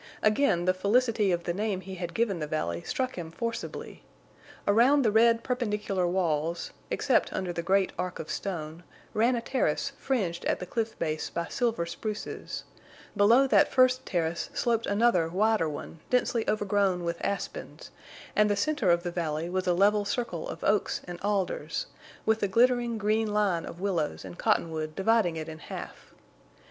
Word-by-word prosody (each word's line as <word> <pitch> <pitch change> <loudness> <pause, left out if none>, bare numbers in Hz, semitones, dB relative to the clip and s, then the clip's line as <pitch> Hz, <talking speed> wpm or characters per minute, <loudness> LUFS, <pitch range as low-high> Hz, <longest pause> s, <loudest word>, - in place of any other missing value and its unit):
Again 215 -5 +3
the 185 - +4
felicity 210 +1 +2
of 175 -1 0
the 175 - -1
name 200 0 -1
he 190 +1 -8
had 175 -2 -5
given 215 -6 +1
the 150 - -3
valley 85 - -2
struck 255 - -2
him 165 -2 -5
forcibly. 230 +7 -5 0.7
Around 245 +7 +5
the 220 - +3
red 230 +1 +4
perpendicular 210 -7 -1
walls, 170 -2 -1 0.2
except - - +2
under 180 -2 -3
the 170 - -2
great 190 +2 +2
arc 180 0 -2
of 160 - -6
stone, 165 -4 -4 0.3
ran 235 +4 +3
a 235 - -1
terrace 260 - 0
fringed 190 -11 -1
at - - +1
the 180 - -5
cliff 225 +4 -3
base 155 -1 -2
by 170 0 -3
silver 230 -8 0
spruces; 210 +5 -5 0.5
below 225 +7 +6
that 270 - +5
first 255 0 +4
terrace 170 -5 -2
sloped 230 -1 +1
another 200 -6 +3
wider 205 -1 +2
one 150 +2 -7
densely 245 -2 +1
overgrown 200 -3 +1
with 170 0 -3
aspens, 200 - -4 0.4
and 210 0 +4
the 205 - +2
center 275 -1 +1
of 170 0 +3
the 175 - -3
valley 165 -1 -2
was 185 0 -1
a 180 - +4
level 205 +3 +4
circle 200 -6 -3
of - - -7
oaks 205 0 +1
and 175 -1 -8
alders, 190 -6 -1 0.4
with 220 0 +3
the 205 - +1
glittering 240 +2 +3
green 215 +1 +1
line 200 -5 +1
of 170 - -9
willows 180 -6 -1
and 175 - -10
cottonwood 160 -7 0
dividing 195 -3 +2
it 155 -1 -5
in 160 0 -8
half. - - -9
200 Hz, 170 wpm, -28 LUFS, 170-225 Hz, 0.7 s, below